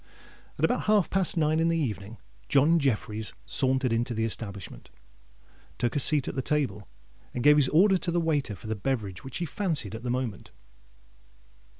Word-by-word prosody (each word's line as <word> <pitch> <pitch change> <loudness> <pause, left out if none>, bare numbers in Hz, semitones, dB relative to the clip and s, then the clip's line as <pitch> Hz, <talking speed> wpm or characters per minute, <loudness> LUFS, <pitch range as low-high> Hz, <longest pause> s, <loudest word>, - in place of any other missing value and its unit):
At - - +2
about - - -1
half 210 -4 +3
past 190 -2 +2
nine 155 0 +2
in 165 - +2
the 165 0 +1
evening, 110 -7 -4 0.3
John 150 +5 +4
Jeffreys 110 -5 -1
sauntered 130 -2 +1
into 120 +1 -1
the 110 +1 0
establishment, 100 - -5 0.9
took 120 +3 -1
a - - +2
seat 145 -1 +3
at - - -3
the 135 - -2
table, 135 -7 -2 0.5
and 120 - -2
gave 150 0 +6
his 135 -3 +4
orders 190 +4 +4
to 175 - -1
the 175 - +1
waiter 145 -9 0
for - - -15
the 110 0 -2
beverage 100 -5 -3
which 135 - -6
he 175 - -2
fancied 155 - -1
at 110 - -6
the 125 - -4
moment. 120 -6 -3
130 Hz, 185 wpm, -27 LUFS, 110-160 Hz, 0.9 s, gave